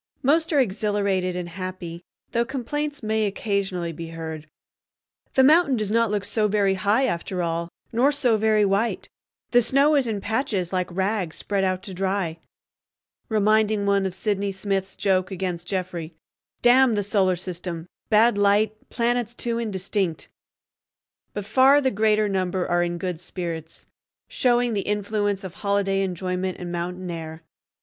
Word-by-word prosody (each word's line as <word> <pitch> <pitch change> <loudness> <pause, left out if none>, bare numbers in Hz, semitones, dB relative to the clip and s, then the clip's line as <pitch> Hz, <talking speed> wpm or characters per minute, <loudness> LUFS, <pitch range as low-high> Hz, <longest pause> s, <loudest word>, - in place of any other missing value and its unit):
Most 320 +5 +3
are 295 - +3
exhilarated 200 -5 0
and 180 -1 -3
happy, 180 -1 -6 0.3
though 235 0 +2
complaints 285 +3 -4
may 215 0 +1
occasionally 195 -4 -2
be 165 +1 -7
heard—"The 160 - -5
mountain 305 0 +5
does 210 -2 -1
not 230 0 +3
look 205 -1 -1
so 215 0 +1
very 200 -2 +2
high 205 +7 +2
after 180 -4 -2
all, 170 0 -2 0.2
nor 250 +5 +3
so 260 -6 +2
very 215 -1 +3
white; 200 +4 0 0.4
the 245 - +6
snow 275 +6 +3
is 275 -4 +3
in 215 -3 -1
patches 205 -5 -1
like 180 -1 0
rags 190 -2 -1
spread 200 -1 -1
out 185 0 0
to 195 - -7
dry," 190 -3 -1 0.9
reminding 215 -1 +2
one 200 -1 +2
of 185 - -6
Sydney 200 0 -1
Smith's 195 0 -2
joke 190 -2 +1
against 180 -2 -4
Jeffrey, 180 -4 -4 0.5
"D—n 245 -1 +6
the 205 - 0
Solar 195 -2 +2
System; 175 -1 -5 0.2
bad 220 0 +4
light, 210 +1 +2
planets 240 0 0
too 235 -1 -2
indistinct." 190 -5 -2 1.1
But 205 - -3
far 260 +6 +5
the 265 -2 +1
greater 215 0 +2
number 185 -2 -1
are 175 0 +2
in 175 0 -1
good 180 -2 -3
spirits, 165 -3 -6 0.4
showing 245 - +2
the 200 - 0
influence 205 -1 -1
of 185 -2 -7
holiday 200 -1 0
enjoyment 185 0 -2
and 175 -1 -5
mountain 180 +1 -4
air. 160 -1 -7
200 Hz, 150 wpm, -24 LUFS, 180-220 Hz, 1.1 s, the